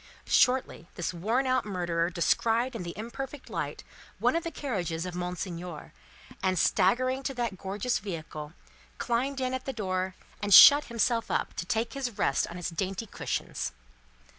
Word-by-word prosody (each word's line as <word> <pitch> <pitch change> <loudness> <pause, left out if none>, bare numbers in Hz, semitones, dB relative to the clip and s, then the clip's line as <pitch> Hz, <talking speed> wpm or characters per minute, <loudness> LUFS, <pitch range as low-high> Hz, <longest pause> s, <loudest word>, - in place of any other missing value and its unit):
Shortly, 250 - +2
this 175 0 -3
worn 225 +10 0
out 255 -1 +2
murderer 175 -4 -1
descried 225 +8 +1
in 225 - -4
the 170 0 -6
imperfect 265 +5 -7
light - - -4 0.3
one - - +2
of 335 - 0
the 335 - -3
carriages 180 - -3
of 180 - -5
Monseigneur, 180 -2 -5 0.5
and, 185 -1 +1
staggering 255 +11 +2
to 270 0 -4
that 235 -6 -2
gorgeous 200 +5 -1
vehicle, 155 -5 -6 0.4
climbed 265 +4 -1
in 255 0 -1
at 260 0 -4
the 270 - -3
door, 185 -3 -2 0.3
and 205 -2 +6
shut 290 +1 +10
himself 235 0 0
up - - -1
to 175 - -5
take 225 +3 -1
his 255 -6 -4
rest 135 - +1
on 175 - -8
its 180 0 -3
dainty 190 +5 -3
cushions. - - -4
205 Hz, 165 wpm, -29 LUFS, 180-255 Hz, 0.5 s, shut